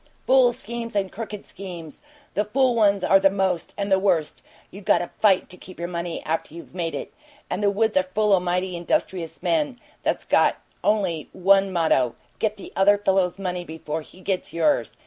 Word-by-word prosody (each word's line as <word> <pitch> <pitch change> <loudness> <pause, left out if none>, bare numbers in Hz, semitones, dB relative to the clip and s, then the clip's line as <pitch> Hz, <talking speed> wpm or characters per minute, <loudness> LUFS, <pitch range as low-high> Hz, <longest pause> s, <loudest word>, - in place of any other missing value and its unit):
Fool 255 -2 +5
schemes 235 -1 -7
and 195 -2 0
crooked 210 -2 -7
schemes; 175 -5 -8 0.3
the 210 - +1
fool 255 +4 +2
ones 200 -4 +3
are 195 - +5
the 195 0 +5
most 190 -3 -1
and 200 -1 -2
the 190 - +5
worst! 175 -6 0 0.3
You 200 - -10
got - - +3
to 175 - -4
FIGHT 195 -4 +4
to 180 - -11
keep 185 +1 -13
your 170 - -3
money 170 -1 -4
after 160 0 -3
you've 170 - -11
made 170 -3 -3
it. - - -6 0.4
And - - -1
the 205 - +3
woods 215 +2 +1
are 185 -1 +2
full 210 -1 +3
o' 190 - +5
mighty 180 +1 -1
industrious 170 0 -2
men 295 -6 0 0.2
that's - - -1
got - - +3 0.3
only 185 -8 0
one 195 +1 +4
motto: 160 -8 +2 0.2
'Get 215 -1 0
the 200 - -11
other 205 +1 +5
fellow's 190 -3 +1
money 180 -2 -3
before 160 -1 -5
he 180 +4 -16
gets 185 -1 -2
yours!' 225 - +1
190 Hz, 195 wpm, -24 LUFS, 175-205 Hz, 0.4 s, Fool